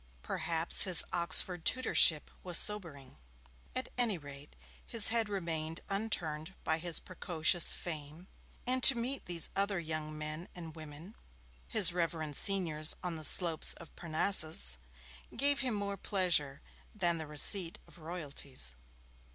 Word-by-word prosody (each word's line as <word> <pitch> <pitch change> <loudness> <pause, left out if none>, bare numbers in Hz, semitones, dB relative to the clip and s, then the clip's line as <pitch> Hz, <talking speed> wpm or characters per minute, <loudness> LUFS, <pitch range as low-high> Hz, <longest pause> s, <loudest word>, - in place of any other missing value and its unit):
Perhaps 165 0 +1
his 185 -3 +6
Oxford 175 0 +3
tutorship 170 -11 +1
was 180 -2 -1
sobering. 165 - -1 0.6
At 255 - -6
any 225 -6 -1
rate 145 -1 -14 0.3
his 230 -3 +5
head 225 -2 -2
remained 165 -4 -5
unturned 190 -5 -4
by 160 0 -3
his 170 0 -1
precocious 175 -2 0
fame, 155 +1 -9 0.4
and 255 +1 -3
to 260 0 +9
meet 250 +3 -4
these 170 -2 -2
other 200 -1 -2
young 155 -2 -6
men 155 +3 -8
and 165 -3 -11
women 155 +5 -13 0.5
his 200 -7 +1
reverend 165 -4 -5
seniors 165 -6 +3
on 175 -2 -5
the 155 - -9
slopes 165 0 +2
of 170 - -16
Parnassus 155 - +4 0.6
gave 280 +2 +1
him 250 -4 -4
more 200 -1 -5
pleasure 170 -10 -3 0.3
than 175 -4 -2
the 160 - -7
receipt 165 +4 +2
of - - -20
'royalties'. 145 - -7
170 Hz, 135 wpm, -30 LUFS, 155-195 Hz, 0.6 s, to